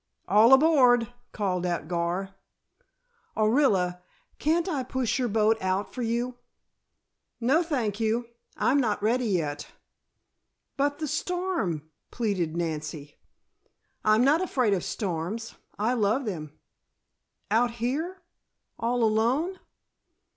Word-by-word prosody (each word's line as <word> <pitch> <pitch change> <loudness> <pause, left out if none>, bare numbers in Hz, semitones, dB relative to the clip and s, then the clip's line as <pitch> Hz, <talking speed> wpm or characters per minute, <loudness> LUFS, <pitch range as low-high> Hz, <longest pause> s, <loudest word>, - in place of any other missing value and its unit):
"All 220 +4 +6
aboard!" 255 -5 +5 0.2
called 185 -4 -1
out 175 -2 -2
Gar. 175 +3 -2 1.0
"Orilla, 215 -6 +2 0.4
can't 330 +4 +1
I 300 -7 -1
push 255 -1 -1
your 250 - +1
boat 220 0 +2
out 190 +2 -1
for 255 - -5
you?" 240 +2 -2 1.0
"No, 265 +8 +3
thank 245 - -2
you. 225 +2 0 0.3
I'm 280 - +3
not 215 -5 0
ready 240 +3 +1
yet." 150 -7 -1 1.1
"But 285 +1 0
the 310 0 -3
storm," 310 - -2 0.2
pleaded 185 -8 -2
Nancy. 155 -3 -4 0.8
"I'm 215 +2 +4
not 295 +6 +4
afraid 255 - +1
of 185 - -1
storms. 195 +4 -3 0.2
I 220 +4 +1
love 230 +3 +1
them." 155 -8 -5 1.0
"Out 235 +3 +3
here, 290 +11 -3 0.6
all 240 +1 0
alone?" 245 - +1
225 Hz, 110 wpm, -27 LUFS, 190-260 Hz, 1.1 s, All